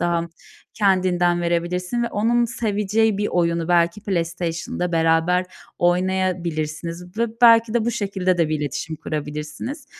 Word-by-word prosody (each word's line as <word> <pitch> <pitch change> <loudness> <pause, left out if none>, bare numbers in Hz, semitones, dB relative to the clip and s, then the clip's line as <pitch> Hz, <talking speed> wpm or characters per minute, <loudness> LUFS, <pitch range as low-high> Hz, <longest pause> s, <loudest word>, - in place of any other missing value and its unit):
daha 170 -1 +1 0.5
kendinden 185 -4 +2
verebilirsin 175 +6 -1
ve 235 - -1
onun 235 +3 +2
seveceği 220 -2 0
bir 210 - 0
oyunu 170 -1 0
belki 170 +2 +2
PlayStation'da 175 -1 -2
beraber 165 +2 +2 0.3
oynayabilirsiniz 175 -1 -1
ve 235 - +2 0.2
belki 230 -1 +6
de 230 -2 +2
bu 235 - +1
şekilde 195 -4 -1
de 165 -2 +2
bir 155 -1 -1
iletişim 150 +3 -4
kurabilirsiniz. 155 - -5
180 Hz, 125 wpm, -22 LUFS, 170-205 Hz, 0.5 s, belki